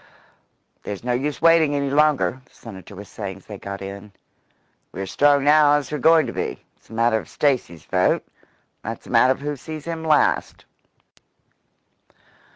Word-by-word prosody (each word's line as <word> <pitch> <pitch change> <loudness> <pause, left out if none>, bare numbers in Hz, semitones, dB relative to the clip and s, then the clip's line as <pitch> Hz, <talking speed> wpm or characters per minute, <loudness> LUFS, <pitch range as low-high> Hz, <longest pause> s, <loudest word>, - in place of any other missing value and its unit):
"There's 100 0 -7
no 125 - -1
use 135 +1 -3
waiting 165 -3 +5
any 140 -1 -1
longer," 145 -3 +2
the - - -29
Senator 95 +1 -11
was 100 +2 -10
saying 100 -3 -7
as 95 - -19
they 105 -2 -9
got 100 0 -7
in. 100 +1 -9 0.8
"We're 95 - -5
as 95 - -7
strong 145 -1 +3
now 150 0 +5
as 145 -2 -2
we're 150 - -3
going 160 +3 +5
to - - -5
be. - - -5
It's - - -30
a - - -12
matter 115 0 +2
of 90 - -12
Stacy's 125 - -1
vote, - - +1 0.6
and - - -4
that's - - -25
a - - -11
matter 130 +1 +5
of 135 - -14
who 145 0 -3
sees 155 +2 -8
him 165 -1 -5
last." 155 -2 +1
135 Hz, 180 wpm, -22 LUFS, 100-150 Hz, 0.8 s, waiting